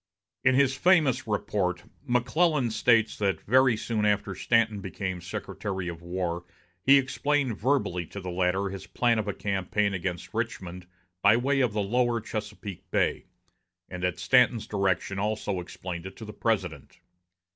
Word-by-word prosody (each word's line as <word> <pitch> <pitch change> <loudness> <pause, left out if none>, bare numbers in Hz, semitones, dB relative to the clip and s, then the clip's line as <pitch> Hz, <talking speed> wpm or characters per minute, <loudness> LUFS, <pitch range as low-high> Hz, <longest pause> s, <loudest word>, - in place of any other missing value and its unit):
In 130 0 +4
his 135 0 +3
famous 155 -8 +3
report, 95 -4 -1 0.2
McClellan 130 +2 +2
states 110 +1 +2
that 95 -5 +1
very 130 0 +4
soon 110 -1 -2
after 105 -1 +1
Stanton 110 +1 +1
became 95 -2 -4
Secretary 95 +1 -5
of 85 -1 -8
War 85 0 -3 0.4
he 135 +7 +7
explained 140 -1 0
verbally 100 - 0
to 100 - -8
the 90 -2 -5
latter 95 +2 0
his 95 0 -8
plan 120 -2 +1
of 105 - -3
a 100 - -1
campaign 100 +1 -1
against 90 -1 -4
Richmond 95 -6 -4 0.3
by 105 +3 +6
way 135 +3 +1
of 125 -5 +2
the 105 -1 0
lower 120 +3 +1
Chesapeake 105 -4 -7
Bay, - - 0 0.6
and 90 -1 -6
at 90 -1 0
Stanton's 115 +4 +3
direction 100 -2 -1
also 105 -2 -1
explained 90 0 -6
it 95 - -10
to 110 - -9
the 105 - -8
President. 95 - -2
105 Hz, 155 wpm, -27 LUFS, 95-120 Hz, 0.6 s, he